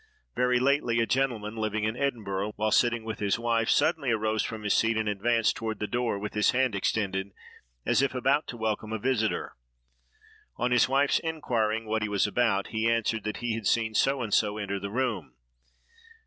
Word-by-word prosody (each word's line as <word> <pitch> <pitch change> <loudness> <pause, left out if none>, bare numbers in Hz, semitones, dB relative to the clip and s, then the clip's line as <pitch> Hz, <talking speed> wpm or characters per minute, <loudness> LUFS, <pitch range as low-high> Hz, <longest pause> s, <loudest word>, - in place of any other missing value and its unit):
Very 125 0 +2
lately, 130 -3 +2
a 115 - +3
gentleman 115 -5 -1
living 110 -1 -1
in 110 +1 -1
Edinburgh, 105 -7 -2
while 110 0 0
sitting 120 -2 +2
with 110 -1 -5
his 100 -1 +1
wife, 115 -1 0
suddenly 155 -5 +2
arose 110 -1 +1
from 110 -2 -5
his 105 - +1
seat 115 0 +2
and 110 -1 -1
advanced 110 +2 +1
toward 110 -1 -4
the 105 - -3
door 120 -1 -1
with 100 +1 -5
his 105 0 +2
hand 130 -2 +2
extended, 100 -1 -1 0.6
as - - +3
if 135 -1 0
about 135 +4 +1
to 120 - -7
welcome 110 -1 -2
a - - 0
visiter. 110 -1 -1 1.0
On 125 +1 0
his 125 -1 +4
wife's 140 +1 +3
inquiring 115 -9 -1
what 110 0 -1
he 105 - -1
was 100 -2 +1
about, 105 -2 +1
he 110 +1 0
answered 115 -1 0
that 105 - -3
he 120 - 0
had 110 -3 -3
seen 110 -2 +1
so 135 +3 +2
and 105 -3 -4
so 105 -1 +2
enter 100 -2 -3
the 100 - -5
room. 105 - -2
110 Hz, 195 wpm, -28 LUFS, 105-125 Hz, 1.0 s, his